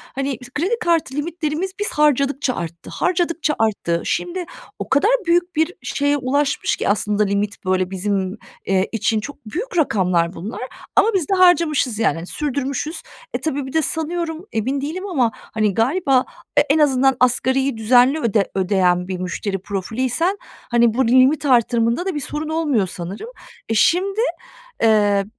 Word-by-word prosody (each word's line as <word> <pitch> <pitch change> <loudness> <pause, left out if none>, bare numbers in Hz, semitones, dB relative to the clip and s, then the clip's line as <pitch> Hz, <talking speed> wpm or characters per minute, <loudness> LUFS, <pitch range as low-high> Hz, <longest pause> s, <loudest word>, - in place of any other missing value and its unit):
hani, 270 -2 -2 0.2
kredi 390 +10 0
kartı 330 -6 0
limitlerimiz 325 +3 -2
biz 415 - 0
harcadıkça 280 -3 +1
arttı, 170 0 -7
harcadıkça 335 -3 0
arttı. 195 -6 0
Şimdi 355 0 -2 0.3
o - - -5
kadar 285 - +3 0.2
büyük 350 0 +2
bir 320 +3 +1
şeye 285 0 0
ulaşmış 280 +2 0
ki - - -2
aslında 210 +1 +1
limit, 200 0 -2
böyle, 185 0 0
bizim, 195 +1 -2 0.3
eee, 190 0 +1
için 220 -1 0
çok 280 0 -9
büyük 360 - -5
rakamlar 185 - +1
bunlar 195 +7 -7 0.3
ama - - +5
biz 360 -6 0
de 390 - +2
harcamışız, 335 - +3
yani 170 -6 0
sürdürmüşüz. 285 +2 -3 0.3
E, - - -2
tabii 285 -3 -2
bir 265 - -8
de 320 - +3
sanıyorum, 325 +2 -3
emin 260 +5 -1
değilim 360 +7 -4
ama 255 - +1
hani 215 -2 -2
galiba 265 - +2 0.3
e - - +8
en 295 - +2
azından 270 -3 +3
asgariyi 260 +1 +2
düzenli 250 +6 +4
öde 215 -6 0
ödeyen 185 -2 +2
bir 185 - -3
müşteri 195 +2 -3
profiliysen, 245 - -1 0.3
hani, 235 -2 +4
burada 250 -1 +1
limit 260 +4 +4
artırımında 235 +3 +2
da 380 -5 -2
bir - - -1
sorun 300 +3 -4
olmuyor 295 - +1
sanırım. 185 - -7 0.4
E, - - +1
şimdi, 375 - +2 0.6
eee, 205 -3 +3
260 Hz, 155 wpm, -20 LUFS, 210-315 Hz, 0.6 s, e